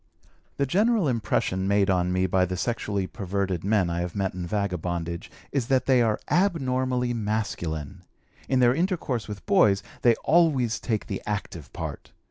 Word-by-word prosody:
The 140 - +2
general 205 - +2
impression 100 -6 0
made 100 0 +3
on 90 -2 +1
me 95 +1 +1
by 95 0 +2
the 90 0 -4
sexually 100 -1 -1
perverted 95 -3 -3
men 100 -2 +2
I 85 0 -2
have 85 -1 -3
met 95 -2 -1
in 90 -1 -5
vagabondage 85 -4 -3 0.2
is 135 -5 -1
that 130 -2 +2
they 130 -2 +4
are 110 -2 +1
abnormally 130 -8 +1
masculine. 95 -7 -3 0.5
In 130 -1 +3
their 120 0 +5
intercourse 165 - -1
with 105 -1 -8
boys 175 - +4 0.2
they 120 -2 +5
always 145 -9 +3
take 110 -3 -2
the - - -4
active 100 -7 -4
part. - - -7
105 Hz, 160 wpm, -26 LUFS, 95-130 Hz, 0.5 s, their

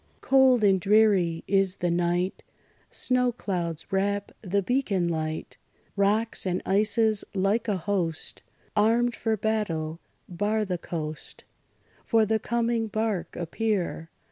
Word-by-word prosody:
Cold 265 -3 +4
and 195 -2 +4
dreary 195 -5 +3
is 195 -1 +2
the 175 -2 -1
night; 175 +2 0 0.5
Snow 250 -1 +1
clouds 175 -8 -4
wrap 200 +1 0
the 200 0 0
beacon 210 -7 0
light; 155 -1 -3 0.4
Rocks 210 +3 +1
and 180 -1 -1
ices, 215 +2 +2
like 200 +4 +1
a 205 -3 +1
host 175 -3 -2 0.3
Armed 235 +3 +3
for 220 0 -1
battle, 175 -7 -2 0.3
bar 210 +4 -1
the 180 -3 -3
coast; 155 -3 -4 0.6
For 225 -2 +3
the 220 +1 +1
coming 235 0 0
bark 215 -3 -2
appear! 175 -2 -2
200 Hz, 120 wpm, -26 LUFS, 175-220 Hz, 0.6 s, Cold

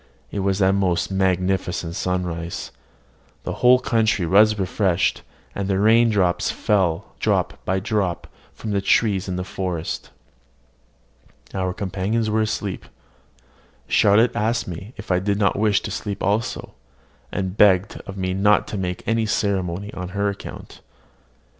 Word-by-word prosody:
It 100 - -3
was 100 0 0
a 95 0 +4
most 95 -2 0
magnificent 90 -2 0
sunrise: 90 -2 -3 0.7
the - - -3
whole 125 +1 +7
country 110 -7 +1
was 105 +5 +5
refreshed, 95 -2 0 0.3
and 100 -1 -3
the 95 -1 +1
rain 115 +3 +4 0.3
fell 95 -3 0
drop - - 0
by 95 +1 +1
drop 100 -4 -1 0.3
from 110 - -5
the 100 -1 +1
trees 100 -1 +2
in 90 - -2
the 90 - -2
forest. 90 -3 -4 1.4
Our 95 -1 -1
companions 105 +2 -1
were 110 +1 +2
asleep. 105 -3 -3 1.0
Charlotte 110 +4 +4
asked 115 +2 0
me 95 +7 -8
if 110 -3 -6
I 90 - +3
did 100 +1 0
not 100 -2 +2
wish 105 -1 +3
to - - -5
sleep 100 -2 -4
also, 105 +4 -1 0.6
and 95 -1 -3
begged 100 -1 +3
of 100 -1 -7
me 95 -1 -1
not 105 +2 +3
to 105 - -4
make 90 -1 -3
any 115 -1 +1
ceremony 100 -2 -1
on 90 -1 -5
her 100 0 +1
account. 100 - -9
100 Hz, 140 wpm, -22 LUFS, 90-105 Hz, 1.4 s, whole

